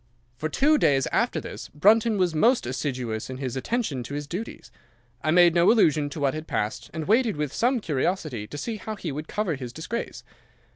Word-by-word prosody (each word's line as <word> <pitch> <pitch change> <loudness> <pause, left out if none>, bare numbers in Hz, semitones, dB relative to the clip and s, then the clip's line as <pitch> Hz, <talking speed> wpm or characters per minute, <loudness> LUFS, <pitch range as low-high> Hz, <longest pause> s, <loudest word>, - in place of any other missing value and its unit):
"'For 155 +6 -3
two 295 - +3
days 135 -2 +3
after - - +1
this - - -8
Brunton 215 +7 +4
was 180 -3 +1
most 235 +11 +3
assiduous 125 -4 -3
in 130 - -5
his 130 -2 -4
attention 150 - -2
to 140 +4 -6
his 145 0 -4
duties. 185 +10 -7 0.5
I 155 - -1
made 175 +1 +6
no 170 +3 +5
allusion 155 -10 +3
to 150 - -7
what 140 -2 +1
had 155 +1 -6
passed, 110 +3 -3
and 160 -1 -5
waited 225 - +3
with 150 -2 -2
some 250 +2 +2
curiosity 150 - -2
to 145 - -8
see 220 +9 -4
how 215 +1 -6
he 175 -6 -5
would 150 +3 -5
cover 210 -5 -1
his 130 -4 -6
disgrace. 165 - -5
155 Hz, 200 wpm, -25 LUFS, 135-210 Hz, 0.5 s, made